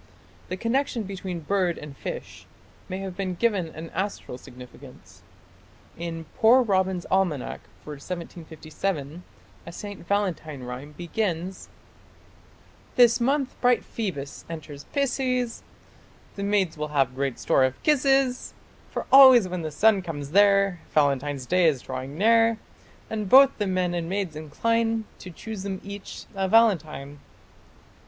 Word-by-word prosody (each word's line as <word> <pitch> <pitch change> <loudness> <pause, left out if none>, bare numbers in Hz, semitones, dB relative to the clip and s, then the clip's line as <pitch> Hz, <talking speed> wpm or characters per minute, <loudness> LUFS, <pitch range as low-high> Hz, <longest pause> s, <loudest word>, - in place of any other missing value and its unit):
The 185 - -3
connection 235 +2 0
between 185 -3 -6
bird 180 +1 0
and 150 -2 -9
fish - - -7 0.4
may 185 - -3
have 190 -2 -6
been 185 -1 -3
given 200 -4 +1
an 160 +1 -9
astral 190 -9 -4
significance. 125 +2 -14 0.7
In 165 -1 -6
"Poor 250 +1 +6
Robin's 190 -4 0
Almanack" 180 -8 0 0.2
for 150 - -8
1757 160 0 -5 0.4
a - - -6
St. 200 -1 -9
Valentine 170 -9 -2
rhyme 125 +4 -7
begins: 180 0 -3 1.3
This 240 -1 +5
month 275 +2 0
bright 245 -1 +3
Phoebus 175 -11 -5
enters 150 -3 -8
Pisces, 255 -3 -1 0.7
The 200 - -6
maids 195 -5 0
will 150 - -2
have 135 -4 +1
good 135 -2 -2
store 135 - +2
of 130 0 0
kisses, 270 -3 +2 0.3
For - - -4
always 260 -6 +9
when 180 -1 -4
the 160 - -3
sun 200 +6 +3
comes 145 -5 -6
there, 195 -1 +4 0.2
Valentine's 140 -2 +1
day 180 +3 +3
is 140 -5 +1
drawing 130 +3 -6
near, 225 +2 +4 0.5
And 215 -3 -4
both 270 +3 +7
the 205 - 0
men 185 -2 0
and 170 -1 -3
maids 190 -4 -2
incline 225 +9 0
To 185 - -9
choose 210 +4 -7
them 190 -1 -4
each 200 0 -8
a 195 -1 -1
Valentine. 160 -10 +2
185 Hz, 135 wpm, -25 LUFS, 155-220 Hz, 1.3 s, always